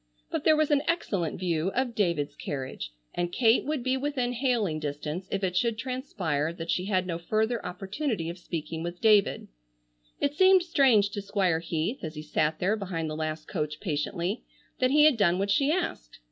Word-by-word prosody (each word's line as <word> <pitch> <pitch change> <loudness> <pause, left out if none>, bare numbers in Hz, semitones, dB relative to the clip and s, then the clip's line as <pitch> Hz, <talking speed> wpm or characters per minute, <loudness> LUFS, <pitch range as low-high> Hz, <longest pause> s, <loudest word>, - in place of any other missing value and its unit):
But - - -2
there 315 - +6
was 310 -1 +2
an 290 -1 +4
excellent 200 - -1
view 170 -1 0
of 255 -1 0
David's 170 -9 0
carriage 130 - -5 0.2
and 175 0 -2
Kate 225 +3 +3
would 295 -3 -2
be 260 +1 +1
within 260 -3 -1
hailing 235 - 0
distance 150 +4 -4
if 195 0 -2
it 180 -1 0
should 230 +2 +1
transpire 215 - -2
that 170 -1 -4
she 180 - 0
had 190 -2 +1
no 170 -2 -3
further 220 +6 0
opportunity 195 - -3
of 170 +2 -6
speaking 160 -2 -5
with 175 +1 -5
David. 210 -3 +3 0.7
It 285 - +1
seemed 375 +3 +6
strange 255 - +4
to 205 - -4
Squire 195 -4 +1
Heath, 165 +8 -2
as 160 -1 -6
he 150 - -6
sat 155 0 0
there 195 +4 +1
behind 175 -6 -3
the - - -4
last 155 0 -4
coach 155 -4 -3
patiently, 175 +5 -2 0.4
that 255 - +3
he 300 +2 +5
had 305 -6 +5
done 180 -4 +3
what 200 +1 0
she 280 +8 +3
asked. 310 - -3
195 Hz, 190 wpm, -28 LUFS, 165-245 Hz, 0.7 s, there